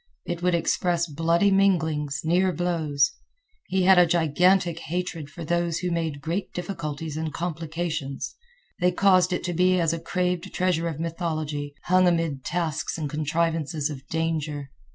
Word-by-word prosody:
It 175 Hz, -1 st, -4 dB
would 180 Hz, -1 st, +2 dB
express 170 Hz, 0 st, +1 dB
bloody 165 Hz, +5 st, +2 dB
minglings, 160 Hz, -7 st, +2 dB
near 180 Hz, +3 st, +3 dB
blows. 160 Hz, -5 st, +1 dB, 0.6 s
He 190 Hz, 0 st, +1 dB
had 190 Hz, 0 st, +7 dB
a 175 Hz, -, +6 dB
gigantic 170 Hz, +2 st, +3 dB
hatred 170 Hz, -3 st, -4 dB
for 165 Hz, +2 st, -8 dB
those 170 Hz, 0 st, 0 dB
who 180 Hz, 0 st, -2 dB
made 160 Hz, -4 st, -2 dB
great 170 Hz, +6 st, -3 dB
difficulties 160 Hz, -4 st, -4 dB
and 160 Hz, -1 st, -2 dB
complications. 160 Hz, -3 st, -4 dB, 0.4 s
They 180 Hz, 0 st, +3 dB
caused 185 Hz, -1 st, +4 dB
it 180 Hz, -, -1 dB
to 175 Hz, -, -2 dB
be 180 Hz, +2 st, +3 dB
as 165 Hz, -1 st, +2 dB
a 165 Hz, -, -3 dB
craved 180 Hz, +1 st, -1 dB
treasure 175 Hz, -2 st, +1 dB
of 160 Hz, -3 st, -4 dB
mythology, 155 Hz, -3 st, -3 dB
hung 185 Hz, 0 st, +4 dB
amid 165 Hz, -6 st, 0 dB
tasks 165 Hz, -4 st, -2 dB
and 150 Hz, -3 st, -3 dB
contrivances 155 Hz, 0 st, -1 dB
of 135 Hz, -1 st, -9 dB
danger. 155 Hz, -3 st, -2 dB
165 Hz, 155 wpm, -25 LUFS, 155-180 Hz, 0.6 s, had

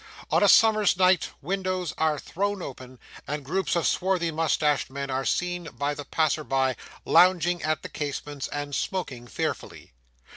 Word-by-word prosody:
On -, -, +3 dB
a -, -, +5 dB
summer's 215 Hz, -4 st, +5 dB
night, 185 Hz, -2 st, +3 dB
windows 185 Hz, -1 st, -2 dB
are 155 Hz, -1 st, +1 dB
thrown 200 Hz, +4 st, -3 dB
open, 130 Hz, -1 st, -9 dB, 0.3 s
and 145 Hz, -1 st, -4 dB
groups 185 Hz, +5 st, -1 dB
of 170 Hz, -, +1 dB
swarthy 180 Hz, -3 st, +1 dB
moustached 155 Hz, -2 st, +1 dB
men 140 Hz, 0 st, -5 dB
are 130 Hz, +1 st, -1 dB
seen 175 Hz, -1 st, -1 dB
by 145 Hz, +1 st, -1 dB
the 145 Hz, 0 st, -7 dB
passer 155 Hz, +1 st, 0 dB
by, 130 Hz, 0 st, +1 dB, 0.3 s
lounging 175 Hz, -1 st, +4 dB
at 155 Hz, 0 st, -1 dB
the -, -, -6 dB
casements, 145 Hz, -1 st, -4 dB
and 145 Hz, 0 st, -5 dB
smoking 135 Hz, -9 st, -3 dB
fearfully. -, -, -5 dB
155 Hz, 155 wpm, -26 LUFS, 140-185 Hz, 0.3 s, a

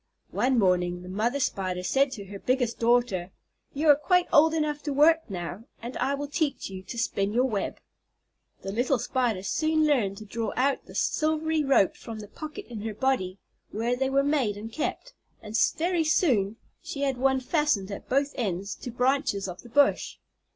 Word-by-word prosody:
One 255 Hz, +1 st, +1 dB
morning 180 Hz, -3 st, +2 dB
the 180 Hz, -, -9 dB
mother 230 Hz, +8 st, 0 dB
Spider 185 Hz, -7 st, -1 dB
said 275 Hz, +8 st, +2 dB
to 200 Hz, -5 st, -7 dB
her 200 Hz, +1 st, -9 dB
biggest 250 Hz, -1 st, 0 dB
daughter, 230 Hz, -6 st, +2 dB, 0.4 s
"You 300 Hz, +3 st, -1 dB
are 290 Hz, -, +9 dB
quite 360 Hz, +5 st, +2 dB
old 315 Hz, +2 st, +6 dB
enough 300 Hz, -2 st, -1 dB
to 290 Hz, -, -3 dB
work 320 Hz, +2 st, +4 dB
now, 180 Hz, +3 st, -5 dB
and 240 Hz, +2 st, -7 dB
I 270 Hz, +3 st, 0 dB
will 290 Hz, +1 st, -4 dB
teach 290 Hz, -, -2 dB
you 190 Hz, -1 st, -7 dB
to 195 Hz, +6 st, -8 dB
spin 205 Hz, -3 st, 0 dB
your 250 Hz, +3 st, +3 dB
web." 210 Hz, -6 st, -2 dB, 0.9 s
The 195 Hz, -, -4 dB
little 245 Hz, +5 st, +1 dB
Spider 235 Hz, -5 st, -1 dB
soon 310 Hz, +8 st, +1 dB
learned 225 Hz, -10 st, +1 dB
to 215 Hz, -, -9 dB
draw 225 Hz, +2 st, -3 dB
out 270 Hz, +1 st, 0 dB
the -, -, -12 dB
silvery 315 Hz, 0 st, +1 dB
ropes 270 Hz, -9 st, +3 dB
from 225 Hz, -1 st, -7 dB
the 210 Hz, -1 st, -8 dB
pocket 310 Hz, -, -8 dB
in 230 Hz, -4 st, -7 dB
her 220 Hz, -1 st, -4 dB
body 215 Hz, -8 st, 0 dB, 0.3 s
where 235 Hz, +3 st, -1 dB
they 265 Hz, +1 st, 0 dB
were 275 Hz, +1 st, +3 dB
made 275 Hz, -8 st, +1 dB
and 220 Hz, +2 st, -7 dB
kept, -, -, -3 dB, 0.3 s
and 215 Hz, 0 st, -7 dB, 0.2 s
very 345 Hz, 0 st, +1 dB
soon 240 Hz, -, +2 dB, 0.3 s
she 280 Hz, -, -6 dB
had 270 Hz, -2 st, 0 dB
one 265 Hz, +1 st, +2 dB
fastened 260 Hz, -, 0 dB
at 200 Hz, -, -8 dB
both 275 Hz, +2 st, +2 dB
ends 200 Hz, -3 st, -2 dB
to -, -, -7 dB
branches 250 Hz, -4 st, 0 dB
of 180 Hz, -1 st, -7 dB
the 240 Hz, -, -14 dB
bush. 285 Hz, +4 st, +2 dB
250 Hz, 190 wpm, -27 LUFS, 205-285 Hz, 0.9 s, are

